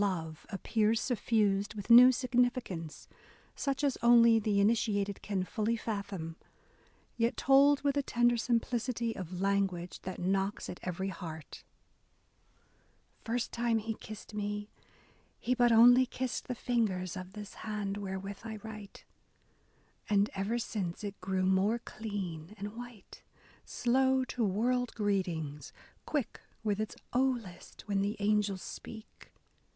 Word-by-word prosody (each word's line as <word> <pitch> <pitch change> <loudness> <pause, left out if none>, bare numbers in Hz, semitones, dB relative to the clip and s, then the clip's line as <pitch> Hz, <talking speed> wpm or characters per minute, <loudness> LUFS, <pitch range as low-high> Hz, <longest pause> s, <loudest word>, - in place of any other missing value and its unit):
BROWNING 195 -3 +2
love 155 -1 -12
appears 220 +2 +1
suffused 210 -5 +1
with 205 +2 -4
new 250 +2 +10
significance, 245 - -1 0.5
such 275 0 -2
as 280 -3 +1
only 235 -1 +7
the 205 -2 +1
initiated 205 -2 +1
can 195 -3 -1
fully 220 +4 -1
fathom, 200 -7 -4 0.4
— - - -33
yet 230 0 +1
told 280 +1 +5
with 285 -1 +2
a 285 - +2
tender 240 -2 +2
simplicity 235 0 -1
of 185 0 -6
language 195 -3 0
that 185 -1 -6
knocks 195 +2 -1
at 180 - -9
every 185 +2 -3
heart: 165 -4 -8 1.6
First 235 +1 -2
time 235 -1 +1
he 225 +1 -2
kissed 215 0 -10
me, 205 0 -4 0.7
he 250 - 0
but 245 -1 +4
only 245 +3 +7
kissed 255 0 -4
The 250 - -3
fingers 205 -8 -1
of 185 +1 -7
this 210 -1 -8
hand 210 -2 -3
wherewith 195 0 -5
I 220 -1 -5
write; 210 -2 -10 1.0
And, 205 0 +3
ever 200 +5 -1
since, 200 -6 -3
it 200 -2 -6
grew 190 0 -1
more 190 +4 +3
clean 200 -6 -6
and 205 +2 -6
white,... 240 -4 -11 0.4
Slow 260 +1 +2
to 245 -1 -2
world 240 +5 0
greetings.., 175 -8 -2 0.4
quick 290 -7 -2 0.2
with 210 -2 0
its 215 - -4 0.2
*Oh, 250 - +3 0.2
list,' 180 -6 -13
When 200 -1 +1
the 205 +2 -1
angels 205 -2 +1
speak. 220 -1 -10
210 Hz, 135 wpm, -32 LUFS, 195-235 Hz, 1.6 s, new